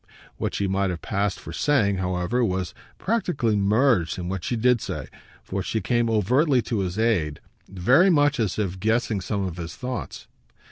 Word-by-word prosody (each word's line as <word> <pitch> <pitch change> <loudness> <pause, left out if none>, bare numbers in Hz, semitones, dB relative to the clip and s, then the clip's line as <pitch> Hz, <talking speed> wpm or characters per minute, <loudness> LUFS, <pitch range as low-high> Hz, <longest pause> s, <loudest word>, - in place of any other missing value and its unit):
What - - -2
she 100 - 0
might 95 0 0
have 90 -2 -5
passed 100 0 -1
for 85 - -9
saying, 105 - +2
however, 90 +6 0
was 95 -4 -1 0.2
practically 180 - 0
merged 100 - +2
in 90 -1 -4
what 95 -2 -4
she 120 - -1
did 120 0 +3
say, - - -4 0.4
for 100 +1 -3
she 110 - -2
came 115 +3 +1
overtly 125 - +2
to 110 0 -2
his 95 0 -2
aid, 95 -10 +1 0.3
very 125 - +4
much 145 -4 +3
as 105 -5 0
if 95 -3 -2
guessing 110 0 0
some 100 +1 -2
of 90 -2 -5
his 85 -2 -6
thoughts. 125 0 -5
105 Hz, 180 wpm, -24 LUFS, 95-125 Hz, 0.4 s, very